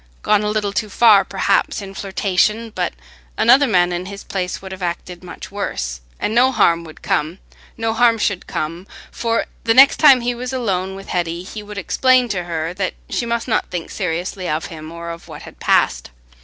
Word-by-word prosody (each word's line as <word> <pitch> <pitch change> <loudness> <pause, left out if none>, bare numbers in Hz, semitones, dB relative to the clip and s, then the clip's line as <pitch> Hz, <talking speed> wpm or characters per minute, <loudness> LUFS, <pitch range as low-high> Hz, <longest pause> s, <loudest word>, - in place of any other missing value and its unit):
Gone 210 -1 +3
a 210 - -1
little 210 -1 -1
too 215 +1 -1
far, 210 -2 +6
perhaps, 195 0 0
in 195 -1 -8
flirtation, 200 +3 0
but - - -2 0.4
another 255 +5 +5
man 180 -5 +3
in 175 +1 -3
his 200 0 -8
place 185 -3 -3
would 190 0 -10
have 190 0 -8
acted 175 0 -4
much 180 - -9
worse; 65 - -4 0.2
and 215 - -1
no 250 +3 +4
harm 170 -8 +3
would 155 - -13
come—no 195 +7 -3
harm 230 0 +4
should 200 -3 -1
come, 165 +5 -4 0.2
for 230 -1 -1 0.2
the 225 0 +2
next 270 +2 +7
time 275 -5 +7
he 245 +1 0
was 250 +2 -5
alone 190 -6 -1
with 195 0 -10
Hetty, 170 -1 -2
he 210 +3 -8
would 210 0 -10
explain 255 +5 +3
to 180 -4 -2
her 165 -1 -3
that 190 0 -3 0.2
she 235 - -1
must 235 +1 -2
not 225 - 0
think 175 -2 -5
seriously 180 0 -3
of 155 +1 -1
him 155 0 -9
or 170 0 -6
of 170 0 -10
what - - -10
had - - -13
passed. - - +2
195 Hz, 195 wpm, -19 LUFS, 175-225 Hz, 0.4 s, next